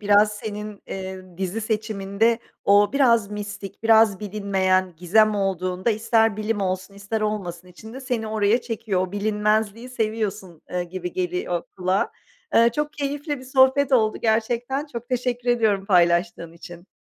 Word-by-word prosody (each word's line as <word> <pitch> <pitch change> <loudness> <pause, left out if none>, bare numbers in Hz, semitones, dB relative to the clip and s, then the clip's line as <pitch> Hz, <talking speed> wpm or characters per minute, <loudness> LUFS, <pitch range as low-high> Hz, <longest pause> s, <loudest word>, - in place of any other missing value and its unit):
biraz 210 0 +4
senin, 210 -1 -7
eee, 185 -2 -7
dizi 190 +3 -2
seçiminde 215 0 0 0.3
o 205 +1 +5
biraz 235 -7 +3
mistik, 205 -1 -7
biraz 220 -3 +5
bilinmeyen 190 -3 0
gizem 215 +5 +3
olduğunda, 185 +1 -1
ister 225 0 +2
bilim 215 -1 -2
olsun 185 +1 -3
ister 200 +2 -4
olmasın 185 -5 -3
içinde 220 +8 -11
seni 245 -4 -2
oraya 215 +2 +2
çekiyor, 225 -5 -2
o 180 - -14
bilinmezliği 215 +2 0
seviyorsun, 215 -7 -3
eee, 180 0 -2
gibi 180 0 -6
geliyor 180 -1 -2
kulağa. 185 +1 0 0.4
Eee, 235 +1 +6
çok 300 0 -1
keyifli 290 +1 -3
bir 255 - -12
sohbet 265 +1 +3
oldu 220 -4 +3
gerçekten, 240 +5 0
çok 235 0 -6
teşekkür 245 -1 -2
ediyorum 215 -5 +2
paylaştığın 175 -1 +2
için. 175 +1 -12
210 Hz, 140 wpm, -23 LUFS, 190-230 Hz, 0.4 s, Eee